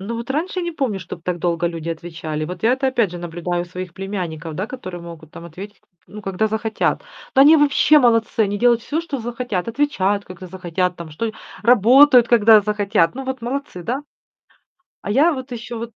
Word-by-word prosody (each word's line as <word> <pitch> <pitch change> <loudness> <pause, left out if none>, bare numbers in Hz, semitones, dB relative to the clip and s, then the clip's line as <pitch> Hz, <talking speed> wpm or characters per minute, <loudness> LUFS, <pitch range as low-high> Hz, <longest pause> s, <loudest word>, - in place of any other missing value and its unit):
Ну 210 +5 -5
вот 235 +3 -7
раньше 340 +6 -2
не 345 -1 -3
помню, 260 -10 -2
чтоб 170 -1 -9
так 175 0 -3
долго 170 0 0
люди 165 -1 -5
отвечали. 165 -2 -5
Вот 180 +6 -7
я 230 - +4
это, 265 +1 0
опять 240 -7 +1
же, 175 - -6
наблюдаю 175 +1 -3
у - - -6
своих 180 0 -8
племянников, 175 -5 -5
да, 190 +6 -3
которые 185 -9 -8
могут 165 -2 -11
там 170 - -11
ответить 195 +6 -10
к - - -38 0.2
ну, 210 - -10
когда 195 +2 -1
захотят. 220 0 -1 0.3
Да 265 - +5
они 300 +4 +8
вообще 295 +1 +5
молодцы, 230 -4 +2
они 205 -1 +1
делают 240 0 +3
всё, 305 +6 -2
что 315 -5 -5
захотят. 235 -4 -3
Отвечают, 205 -7 0
когда 185 0 -10
захотят 180 0 -2
там 170 -2 -9
что 220 +9 -3 0.3
работают, 245 +3 +6
когда 220 -2 +6
захотят. 205 -4 +1
Ну 270 +1 -6
вот 265 -1 -4
молодцы, 245 -6 -5
да? 250 - -3 1.0
А - - -5
я 290 +10 +4
вот 260 -2 -6
ещё 235 0 -6
вот 230 +1 -6
210 Hz, 205 wpm, -20 LUFS, 175-250 Hz, 1.0 s, они